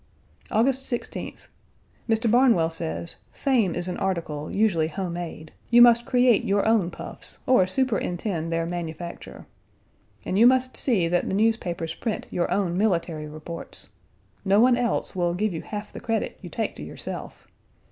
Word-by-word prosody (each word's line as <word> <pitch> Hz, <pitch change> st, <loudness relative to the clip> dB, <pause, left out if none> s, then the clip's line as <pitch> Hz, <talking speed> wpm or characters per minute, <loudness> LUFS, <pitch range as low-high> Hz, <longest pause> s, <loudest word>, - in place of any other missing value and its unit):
August 260 Hz, +5 st, +1 dB
16th. 240 Hz, -, -5 dB, 0.6 s
Mr. 225 Hz, 0 st, +2 dB
Barnwell 235 Hz, -10 st, +4 dB
says, 85 Hz, -, -4 dB, 0.2 s
Fame 235 Hz, -, +1 dB
is 175 Hz, 0 st, -2 dB
an 180 Hz, -, -3 dB
article 160 Hz, -5 st, -2 dB
usually 195 Hz, -7 st, +2 dB
home 180 Hz, +1 st, -4 dB
made; 170 Hz, -2 st, -6 dB, 0.2 s
you 240 Hz, -, +6 dB
must 240 Hz, 0 st, +7 dB
create 250 Hz, -3 st, +4 dB
your 200 Hz, +1 st, +1 dB
own 220 Hz, -6 st, +3 dB
puffs -, -, -7 dB
or 220 Hz, -8 st, +4 dB
superintend 185 Hz, -7 st, -1 dB
their 165 Hz, 0 st, 0 dB
manufacture. 170 Hz, 0 st, -6 dB, 0.8 s
And 190 Hz, -, 0 dB
you 235 Hz, -, +8 dB
must 255 Hz, 0 st, +2 dB
see 205 Hz, -10 st, +2 dB
that 175 Hz, +1 st, 0 dB
the -, -, -1 dB
newspapers 190 Hz, -7 st, 0 dB
print 225 Hz, -3 st, -3 dB
your 175 Hz, -, 0 dB
own 185 Hz, -4 st, 0 dB
military 170 Hz, -7 st, 0 dB
reports. 155 Hz, +2 st, -4 dB, 0.5 s
No 195 Hz, +1 st, +4 dB
one 245 Hz, +2 st, +6 dB
else 240 Hz, -4 st, -1 dB
will 175 Hz, -1 st, 0 dB
give 210 Hz, +1 st, 0 dB
you 160 Hz, -, -4 dB
half 210 Hz, 0 st, -7 dB
the -, -, -7 dB
credit 225 Hz, -1 st, -2 dB
you -, -, -8 dB
take -, -, -3 dB
to -, -, -7 dB
yourself. -, -, -7 dB
190 Hz, 155 wpm, -25 LUFS, 170-230 Hz, 0.8 s, you